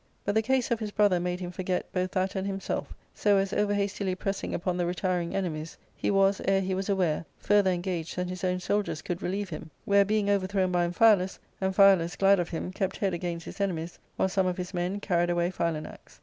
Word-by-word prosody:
But 205 - +1
the 220 - +3
case 255 +2 0
of 235 - +1
his 215 -2 -3
brother 205 -3 +3
made 180 +1 -2
him 175 -1 -4
forget 180 0 -2
both 185 0 0
that 185 0 0
and 190 0 -2
himself, 195 -1 -3 0.2
so 205 -1 +3
as, 195 +1 0
over 205 0 +1
hastily 200 -2 -1
pressing 195 +1 -3
upon 180 +1 -1
the 175 -1 0
retiring 180 -1 -1
enemies, 165 -4 -3 0.2
he - - -1
was, 195 0 +3
ere 195 0 +3
he 190 0 -1
was 190 +2 -2
aware, 180 -6 +1
further 205 -1 +3
engaged 175 -2 -2
than 180 0 -2
his 185 +1 -6
own 180 0 +1
soldiers 200 -3 -1
could 175 -1 -4
relieve 195 +2 -2
him, 160 -1 -7 0.2
where, 200 0 +5
being 210 0 0
overthrown 190 -2 +1
by 175 -1 +2
Amphialus, 190 0 +4 0.2
Amphialus, 190 -2 +4
glad 195 0 +5
of 175 - -1
him, 175 +2 -4
kept 190 -1 -2
head 195 -3 0
against 170 -1 -4
his - - -7
enemies, 170 -4 -2 0.2
while - - +2
some 190 0 +1
of 180 0 -1
his 180 +1 -5
men 180 +3 -1
carried 175 -3 +1
away 175 +1 +1
Philanax. 165 -3 -4
185 Hz, 220 wpm, -28 LUFS, 175-200 Hz, 0.2 s, where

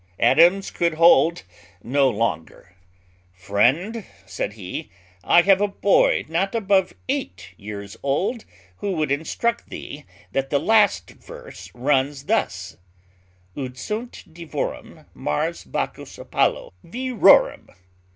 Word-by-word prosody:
Adams 175 +4 +4
could 170 -2 0
hold 165 - +4 0.4
no 135 +2 +2
longer: 100 -6 -4 0.6
"Friend," 125 - 0 0.2
said 95 +2 -4
he, 95 -4 -7 0.3
"I 175 - +5
have 195 +1 +4
a 205 - +3
boy 200 0 +2
not 185 +7 -1
above 200 -4 +1
eight 90 +2 -4
years 100 0 -8
old 185 - -1 0.3
who 200 - -3
would 155 -4 -1
instruct 230 +11 -2
thee 145 +1 -9 0.3
that 135 0 -2
the 140 - +2
last 215 +6 +2
verse - - -12
runs 135 +2 0
thus: 80 - -2 0.8
_"'Ut 130 -2 -6
sunt 220 - -6
Divorum, 170 -1 -6
Mars, 75 0 -3
Bacchus, - - -5
Apollo, - - -1
virorum.'" 250 +5 +3
155 Hz, 110 wpm, -22 LUFS, 120-195 Hz, 0.8 s, I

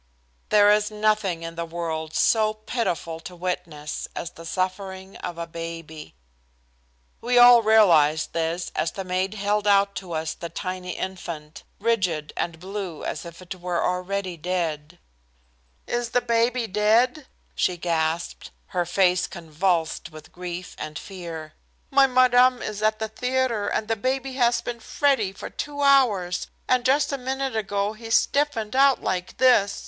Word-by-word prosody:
There 205 -1 +6
is 210 +1 +3
nothing 210 -5 0
in 165 0 -5
the 170 0 -4
world 165 -2 -4
so 215 -1 +3
pitiful 215 -7 -3
to 180 +2 -10
witness 170 -4 -4
as 170 - -4
the 165 -1 -11
suffering 190 +1 -3
of 175 - -6
a 170 - -3
baby. 165 - -8 1.1
We 245 +1 +1
all 245 -1 +9
realized 170 -9 +4
this 165 +1 -2
as 160 +1 -1
the 195 - -5
maid 185 +2 -1
held 205 0 0
out 200 0 +4
to 180 -3 -6
us 160 0 -2
the 170 - -7
tiny 185 +1 -5
infant, 170 -5 -6 0.2
rigid 190 -9 0
and 165 -1 -3
blue 190 -3 -6
as 150 - -4
if 170 +2 -10
it 180 - -6
were 180 -1 -2
already 180 0 -2
dead. 165 -1 -3 0.9
"Is 240 -1 -2
the 245 - +2
baby 235 +1 +1
dead?" 225 +7 +2 0.3
she 180 - 0
gasped, 165 -1 -2 0.2
her 175 -2 -1
face 180 0 +2
convulsed 165 0 -1
with 155 -1 -13
grief 180 0 -7
and 155 0 -5
fear. 165 -5 -8 0.4
"My 275 0 +6
madam 255 0 +4
is 210 -1 -4
at 215 0 +2
the 220 - -3
theatre, 250 -1 -1
and 215 - -1
the 225 - +1
baby 260 +4 -2
has 240 -2 +2
been 240 -1 -5
fretty 250 -5 +1
for 195 - -9
two 290 -1 -5
hours, 215 -11 +3 0.2
and 255 -1 +3
just 275 +4 +3
a 275 - -2
minute 265 0 -2
ago 205 -1 -1
he 225 +1 -10
stiffened 255 -2 +1
out 275 0 +4
like 180 -1 -2
this. 230 -6 +4
190 Hz, 155 wpm, -24 LUFS, 170-230 Hz, 1.1 s, all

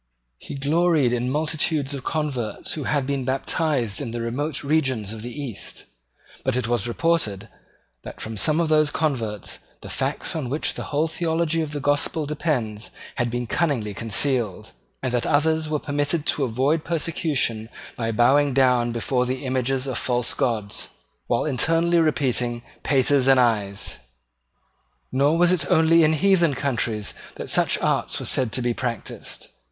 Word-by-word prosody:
He - - -8
gloried 150 -2 +2
in 125 +1 0
multitudes 150 0 0
of 135 -2 -5
converts 140 -8 -2
who 150 -4 -4
had 145 -3 0
been 140 -1 -1
baptized 130 - 0
in - - -4
the 120 +1 -4
remote 135 +6 -2
regions 135 -8 0
of 110 - -7
the 120 - -6
East: 130 -8 -5 0.6
but 130 -1 +1
it 125 -3 -1
was 120 0 0
reported 120 - 0 0.5
that - - -10
from 110 0 -5
some 155 - +3
of 170 - +2
those 155 -1 +4
converts 120 - -2 0.2
the - - -8
facts - - -2
on 145 -6 -3
which 145 +4 -1
the - - -5
whole 150 +2 0
theology 165 0 0
of 155 -2 -3
the 145 - -3
Gospel 145 +2 0
depends 130 -9 -2 0.3
had 120 -2 +1
been 120 +1 -2
cunningly 120 -7 0
concealed, 115 -1 0 0.3
and 130 -2 -1
that 120 - 0
others 155 +1 +2
were 155 - +1
permitted 145 +2 -1
to 145 - +1
avoid 135 +7 +1
persecution 145 -9 0 0.3
by 115 -1 -2
bowing 135 +5 +4
down 125 -3 +3
before 125 +2 0
the 130 +2 -3
images 130 0 0
of 130 -3 -2
false 120 -1 0
gods, 110 -5 -2 0.4
while 120 - +1
internally 165 +4 +2
repeating 125 -7 0 0.2
Paters 135 -1 +3
and 135 -1 +6
Ayes. 105 -5 0 1.1
Nor 145 +5 +3
was 175 +1 +5
it 155 -6 +1
only 165 +1 +5
in 155 0 +4
heathen 170 -3 +3
countries 120 -6 -1 0.2
that - - -4
such - - +3
arts - - 0
were - - -5
said 125 -4 +2
to 125 0 0
be 120 0 +1
practised. 120 -3 -5
135 Hz, 160 wpm, -23 LUFS, 120-155 Hz, 1.1 s, and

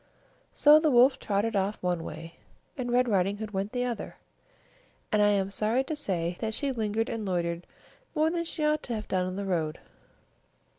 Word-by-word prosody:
So 300 +1 +7
the 310 0 +2
Wolf 255 +1 +5
trotted 210 +2 -1
off 200 +2 0
one 175 -2 0
way, 165 +2 -8 0.4
and 250 -4 -3
Red 250 +1 +3
Riding 200 -1 +1
Hood 215 0 -6
went 195 +1 -2
the 245 -1 -1
other; 240 -2 -4 1.0
and 210 - +3
I 205 - +5
am 195 -1 +1
sorry 220 +6 +1
to 310 +3 -4
say 175 - -2
that 220 -1 -2
she 280 -2 -1
lingered 225 -2 -1
and 225 -1 -4
loitered 170 -3 -2 0.5
more 310 +1 +2
than 340 0 -2
she 315 -2 -2
ought 305 0 +2
to 240 - -4
have 215 - -5
done 185 -1 0
on 185 - -4
the 200 0 -3
road. 160 -5 -1
215 Hz, 195 wpm, -28 LUFS, 190-250 Hz, 1.0 s, So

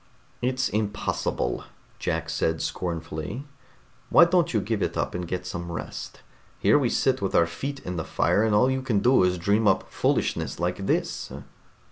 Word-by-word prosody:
"It's 130 0 +1
impossible," 105 - -1 0.4
Jack - - -1
said 80 0 0
scornfully. 85 - -4 0.6
"Why 170 - +8
don't 170 -2 +2
you 110 - +2
give 105 +1 -2
it - - -1
up - - -1
and 90 0 -4
get 90 +1 -3
some 85 0 -5
rest? 85 - -6 0.4
Here 145 - +4
we 130 -4 +1
sit 130 0 +1
with 95 - -1
our 85 - +6
feet 135 +11 -5
in 90 0 -5
the 80 - -1
fire, 105 - +1
and 110 -2 +2
all 115 +5 +5
you 130 0 -1
can 125 -5 0
do 125 +1 +5
is 90 0 +2
dream 100 +5 +2
up 95 - +2
foolishness - - 0
like 90 +3 -2
this." - - -1
100 Hz, 175 wpm, -26 LUFS, 90-125 Hz, 0.6 s, Why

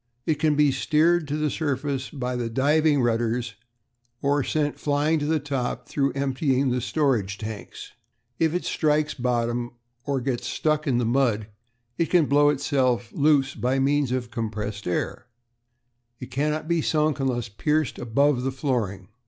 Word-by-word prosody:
"It 155 -2 0
can 155 -1 +2
be 145 -1 +4
steered 160 +3 +2
to 145 +1 -2
the 150 -1 0
surface 140 -3 -2
by 125 -4 -4
the 120 -1 -2
diving 145 +3 +3
rudders, 120 0 0 0.7
or 140 +1 +1
sent 150 0 -1
flying 150 +2 +1
to 145 - -2
the 160 0 +2
top 135 -3 -3
through 140 -1 0
emptying 135 -1 0
the 125 0 0
storage 120 -8 0
tanks. 110 -1 -8 0.5
If 165 0 +2
it 180 - -2
strikes 150 -1 +1
bottom, 120 -1 -1 0.3
or 140 -1 -1
gets 125 -1 -2
stuck 155 0 0
in 130 -3 +2
the 120 - +1
mud, 115 -4 +1 0.5
it 170 - +2
can 175 -4 +4
blow 145 +1 +4
itself 130 -5 0
loose 145 -2 +2
by 125 +2 0
means 140 0 +1
of 130 -1 0
its 120 -3 -18
compressed 105 -3 -4
air. 90 +6 -2 0.9
It 125 - -9
cannot 150 +3 -1
be 170 -1 +1
sunk 155 -1 +1
unless 125 -4 -1
pierced 150 +7 -1
above 125 +3 +2
the 135 +1 -1
flooring. 115 -9 -2
135 Hz, 160 wpm, -25 LUFS, 120-150 Hz, 0.9 s, be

